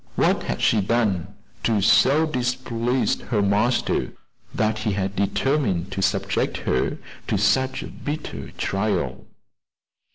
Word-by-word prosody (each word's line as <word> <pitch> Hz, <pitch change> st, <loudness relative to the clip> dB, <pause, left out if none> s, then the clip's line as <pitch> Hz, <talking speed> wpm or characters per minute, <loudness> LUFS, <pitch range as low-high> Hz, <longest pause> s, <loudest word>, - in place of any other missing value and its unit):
What -, -, +2 dB
had -, -, -3 dB
she 110 Hz, -, +4 dB
done 100 Hz, -3 st, 0 dB, 0.3 s
to 110 Hz, -3 st, +2 dB
so 135 Hz, +9 st, +5 dB
displease 125 Hz, -3 st, -1 dB
her 105 Hz, -3 st, +1 dB
master, 105 Hz, +5 st, +1 dB, 0.4 s
that 110 Hz, 0 st, 0 dB
he 110 Hz, -2 st, -1 dB
had 95 Hz, 0 st, -2 dB
determined 100 Hz, -, 0 dB
to 95 Hz, -, -3 dB
subject 95 Hz, -, 0 dB
her 65 Hz, +1 st, 0 dB, 0.3 s
to -, -, +1 dB
such 130 Hz, +7 st, +1 dB
a -, -, -6 dB
bitter 150 Hz, +1 st, -6 dB
trial? 100 Hz, -2 st, -2 dB
110 Hz, 125 wpm, -23 LUFS, 100-125 Hz, 0.4 s, so